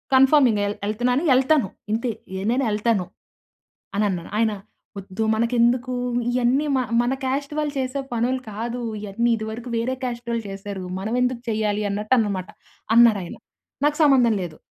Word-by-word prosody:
Confirming 260 -5 +5
L 205 - -2
ఎళ్తున్నాను. 245 +6 +1
ఎళ్తాను. 265 -4 +3 0.3
ఇంతే 235 +2 0 0.4
నేను 265 +2 +1
ఎళ్తాను 210 -3 +1 0.9
అని 210 - +2
అన్నాను. 175 -3 -4
"ఆయన 220 -1 +2 0.4
వద్దు 195 +2 -4
మనకెందుకు 240 +2 +2 0.4
ఇయన్నీ 250 +4 +2
మ 260 - +2 0.2
మన 245 +2 0
కాస్ట్ 280 +3 -2
వాళ్ళు 295 -1 -1
చేసే 260 +2 -2
పనులు 250 +2 0
కాదు 235 +4 -4 0.2
ఇయన్నీ 215 +4 -1
ఇది 220 - -5
వరకు 240 +2 -7
వేరే 255 +3 -1
కాస్ట్ 240 -1 -4
వాళ్ళు 230 -1 -1
చేసారు. 195 -1 -6 0.2
మనం 215 +4 -3
ఎందుకు 250 -1 0
చేయాలి 215 -1 0
అన్నట్టు 210 +4 -1
అన్నమాట" 200 -4 0 0.5
అన్నారు 230 -4 +6
ఆయన. 170 - -8 0.5
"నాకు 295 0 +2
సంబంధం 250 -6 +5
లేదు. 160 -3 -6
235 Hz, 150 wpm, -23 LUFS, 210-255 Hz, 0.9 s, అన్నారు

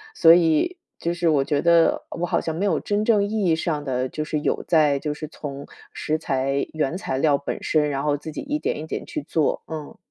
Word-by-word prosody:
所 165 0 +8
以， 170 - +2 0.2
就 170 +1 -1
是 170 -1 -1
我 140 -3 +3
觉 145 0 0
得， 170 -1 +4
我 175 - -2
好 - - +1
像 160 -1 -3
没 195 +5 -1
有 200 - +1
真 205 +1 -1
正 210 -3 +4
意 215 0 -1
义 165 - +3
上 155 -3 -2
的， 130 -1 -1
就 155 - -4
是 155 0 -2
有 - - -1
在 150 -4 +4
就 150 0 -3
是 155 +1 -7
从 140 -2 -8 0.3
食 155 +1 -1
材 135 -2 -1
原 155 +2 -1
材 135 -9 -3
料 145 0 +3
本 140 - -5
身， 150 -1 +2
然 140 0 -2
后 145 -1 +2
自 155 +2 -8
己 - - -7
一 295 +1 -2
点 - - -2
一 155 - -5
点 - - -4
去 - - -4
做。 155 0 0
嗯。 155 -2 -7
155 Hz, 255 characters per minute, -23 LUFS, 145-170 Hz, 0.3 s, 所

